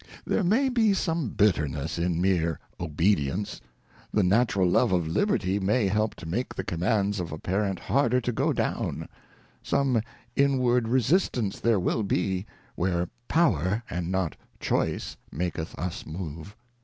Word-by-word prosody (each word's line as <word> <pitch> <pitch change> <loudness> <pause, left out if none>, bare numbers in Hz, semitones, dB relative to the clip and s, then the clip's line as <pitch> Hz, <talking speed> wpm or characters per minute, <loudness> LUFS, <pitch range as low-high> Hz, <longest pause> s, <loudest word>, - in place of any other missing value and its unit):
There 215 - +1
may 225 +10 +3
be 225 -5 +3
some 165 - -1
bitterness 80 -8 +1
in 85 -1 0
meer 85 -4 +1 0.2
Obedience: 85 +2 0 0.5
The 105 - +2
natural 100 -1 +3
Love 110 +5 +3
of 90 -3 +1
Liberty 90 +4 +1
may 100 +3 +2
help 110 +2 0
to - - -10
make 100 +11 -3
the 95 - -3
Commands 100 +3 0
of 85 -2 -4
a 75 - -4
Parent 95 +3 -1
harder 125 +6 +2
to 125 0 -1
go 110 - +1
down: - - -2 0.5
Some 130 -5 +1 0.3
inward 125 -4 +3
resistance 125 - +1
there 115 -3 +3
will 90 +5 0
be, 95 -1 -1 0.3
where 90 -1 0 0.2
Power 110 - +2
and 85 0 -2
not 95 -5 0 0.2
Choice - - -1
maketh 80 0 -3
us 90 +3 -4
move. 80 +3 -7
95 Hz, 145 wpm, -27 LUFS, 85-120 Hz, 0.5 s, may